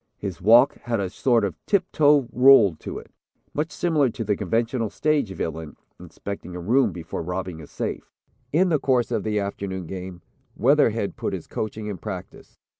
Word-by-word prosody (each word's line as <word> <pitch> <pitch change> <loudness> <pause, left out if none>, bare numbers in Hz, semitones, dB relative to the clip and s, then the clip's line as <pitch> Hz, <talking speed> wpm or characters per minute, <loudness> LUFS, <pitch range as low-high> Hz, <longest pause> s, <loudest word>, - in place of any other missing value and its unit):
His 95 -4 -6
walk 115 +7 +6
had 115 -2 0
a 95 -2 -2
sort 115 -1 +2
of 90 -6 -6
tip 200 -4 +2
toe 145 -4 +4
roll 125 -7 +6
to - - -7
it, - - -11 0.4
much 155 +2 -1
similar 155 -8 +1
to 115 - -5
the 105 -1 0
conventional 115 +4 -1
stage 150 -5 0
villain, 80 -4 -5 0.2
inspecting 100 -3 -8
a - - -5
room 115 +6 +2
before 85 -1 -6
robbing 90 -1 -4
a 75 - -11
safe. - - -5 0.4
In 180 +5 +3
the 155 -3 +2
course 125 -3 +1
of - - 0
the 105 -1 0
afternoon 100 -2 -4
game, 90 0 -8 0.3
Weatherhead - - +2
put - - -3
his - - -5
coaching 110 0 -5
in 105 -4 -5
practice. - - -8
105 Hz, 180 wpm, -24 LUFS, 95-130 Hz, 0.4 s, walk